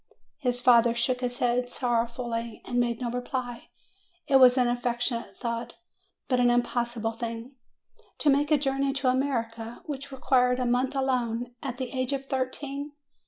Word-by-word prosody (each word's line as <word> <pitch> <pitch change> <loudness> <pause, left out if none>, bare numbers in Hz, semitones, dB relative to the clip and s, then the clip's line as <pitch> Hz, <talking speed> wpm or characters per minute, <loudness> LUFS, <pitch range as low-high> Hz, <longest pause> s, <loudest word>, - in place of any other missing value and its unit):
His 245 -2 -1
father 235 -1 +5
shook 250 +1 0
his 245 -1 -2
head 245 0 +1
sorrowfully 235 -2 -2
and 245 - -1
made 235 -1 0
no 240 -1 -1
reply. 245 -1 -4 0.6
It 270 - +6
was 255 -1 +7
an 250 -1 +4
affectionate 240 0 -1
thought, 235 -1 -3 0.5
but 255 -2 +2
an 245 0 +5
im 240 0 +4
possible 235 -2 -2
thing. 230 +2 -5 0.7
To 290 - +3
make 285 +1 +2
a 305 - +5
journey 275 0 0
to 270 -1 +1
America, 230 -3 -2
which 280 -2 -6
required 250 -1 +2
a 250 - 0
month 250 +3 +1
alone, 245 -3 -1
at 250 -3 -4
the 255 -2 -4
age 255 0 -1
of 275 0 -3
thirteen! 275 +2 -3
245 Hz, 165 wpm, -27 LUFS, 235-265 Hz, 0.7 s, was